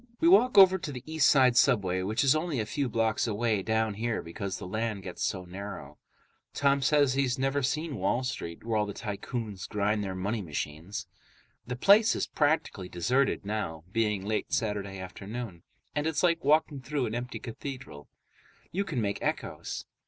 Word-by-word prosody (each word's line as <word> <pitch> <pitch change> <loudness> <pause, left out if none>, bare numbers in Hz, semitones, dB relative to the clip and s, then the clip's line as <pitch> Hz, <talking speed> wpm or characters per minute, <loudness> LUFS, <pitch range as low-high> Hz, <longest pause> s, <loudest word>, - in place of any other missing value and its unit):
We 330 - +3
walk 255 - +5
over 190 -1 +8
to 170 -4 -5
the 125 -3 -7
East 160 -2 +3
Side 130 -3 +5
subway, 100 -8 +3
which 105 +7 0
is 135 +1 +5
only 155 -4 -1
a 110 - -1
few 135 +4 -2
blocks 115 0 +1
away 110 -1 0
down 110 +1 0
here 115 +2 -2
because 95 +3 -5
the - - -7
island 110 0 -2
gets 90 -2 -7
so 95 -2 -1
narrow. 90 -6 -8 0.6
Tom 140 0 +3
says 145 -1 +3
he's 135 -1 +1
never 135 +2 0
seen 150 +2 -1
Wall 100 +7 0
Street, 85 -9 -5
where 115 -1 0
all 105 -1 +1
the 100 - -6
tycoons 105 -2 -5
grind 105 0 0
their 95 -1 -4
money 105 +4 -2
machines. 80 +3 -5 0.6
The 125 - -3
place 205 - +5
is - - 0
practically 145 - 0
deserted 125 +9 +1
now, 100 -7 -3
being 105 -3 0
late 110 +1 -2
Saturday 105 -6 -1
afternoon, 95 +1 -7 0.3
and 150 +1 0
it's 160 +2 0
like 170 -2 +3
walking 150 -1 +2
through 140 -1 -1
an 110 - -4
empty 120 +2 -4
cathedral. 120 - -8 0.6
You 195 +3 0
can 145 -10 -2
make 100 -1 -2
echoes. - - -3
115 Hz, 180 wpm, -29 LUFS, 100-140 Hz, 0.6 s, over